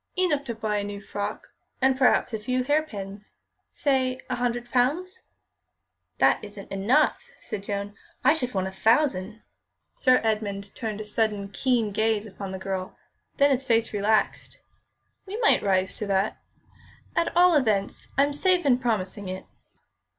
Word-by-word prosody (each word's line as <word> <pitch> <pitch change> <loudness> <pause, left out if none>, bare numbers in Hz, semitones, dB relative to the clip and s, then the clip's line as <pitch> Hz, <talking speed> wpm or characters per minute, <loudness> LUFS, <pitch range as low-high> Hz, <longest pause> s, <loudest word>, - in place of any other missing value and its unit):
"Enough 310 -7 +1
to 235 -3 -4
buy 215 -1 -1
a - - -2
new 205 0 -5
frock 205 +1 -5 0.3
and 265 0 +3
perhaps 255 -2 +3
a 220 - -1
few 255 +4 -1
hairpins; 210 -9 -2 0.4
say 260 -3 0
a 250 - -1
hundred 240 0 -2
pounds." 300 +10 0 1.0
"That - - +3
isn't 205 -1 -10
enough," 255 - +2
said 215 -3 -6
Joan; 200 0 -4 0.3
"I 265 - +6
should 255 -6 -2
want 190 -1 +1
a 190 - -4
thousand." 220 0 +1 0.5
Sir 255 -1 +4
Edmund 205 -3 -2
turned 215 -3 -4
a - - -6
sudden, 210 -2 -1
keen 230 0 +1
gaze 220 +1 +1
upon 195 -2 -7
the 190 - -4
girl; 190 -1 -4 0.4
then 280 0 +5
his 265 0 +2
face 230 -3 +1
relaxed. 210 +1 0 0.7
"We 400 +3 -5
might 455 -2 +4
rise 190 -1 +1
to 210 - -4
that. 195 +1 0 0.8
At 335 0 0
all 355 0 +6
events, 215 -9 +1
I'm 285 +1 +3
safe 360 +3 +2
in 250 -3 +4
promising 205 -5 -2
it." 185 0 -6
220 Hz, 155 wpm, -26 LUFS, 200-265 Hz, 1.0 s, I